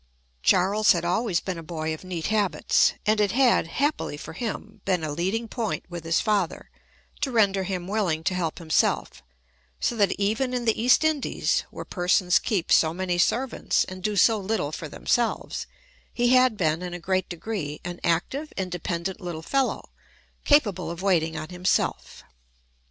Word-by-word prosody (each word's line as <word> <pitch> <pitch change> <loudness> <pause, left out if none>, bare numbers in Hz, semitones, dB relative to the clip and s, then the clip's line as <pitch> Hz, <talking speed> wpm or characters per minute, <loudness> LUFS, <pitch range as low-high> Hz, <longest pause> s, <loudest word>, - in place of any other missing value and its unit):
Charles 195 - +4
had 170 -1 -2
always 180 0 +1
been 185 -3 -5
a - - -7
boy 160 -1 -4
of 155 - -8
neat 180 -3 -5
habits, 205 -3 +2
and 215 0 +3
it 205 -2 +1
had 250 -8 +3
(happily 280 - -1
for - - -8
him) 220 +4 -6
been 180 -4 0
a 155 - -2
leading 190 +9 -1
point 225 -1 -3
with 170 -2 -7
his 165 0 +2
father, 205 -6 -1 0.5
to 295 - -1
render 200 -5 +3
him 180 -2 -4
willing 190 -6 0
to 190 - 0
help 170 -3 -2
himself; 160 - 0 0.6
so 240 - 0
that 205 -3 +2
even 225 +6 -1
in 245 -1 -2
the 225 -1 +1
East 250 +6 +5
Indies, 315 -3 0
where - - -8
persons 180 0 +2
keep 190 -6 -2
so 160 0 +4
many 180 -1 -1
servants, 250 +8 +1
and 185 0 -8
do 210 +2 -1
so 220 +2 +4
little 195 -7 -2
for 155 0 -6
themselves, 235 +9 -1 0.4
he 240 0 +1
had 255 -3 +4
been, 160 -3 +1
in 180 -1 -5
a - - -6
great 185 +1 -1
degree, 175 -4 -4
an 175 0 -6
active, 265 - -1
independent 180 +1 -3
little 170 -3 -5
fellow, 270 +7 -1 0.5
capable 205 - +3
of 170 +2 -6
waiting 165 -5 +1
on 155 +1 -6
himself. 180 0 -1
185 Hz, 170 wpm, -25 LUFS, 170-220 Hz, 0.6 s, East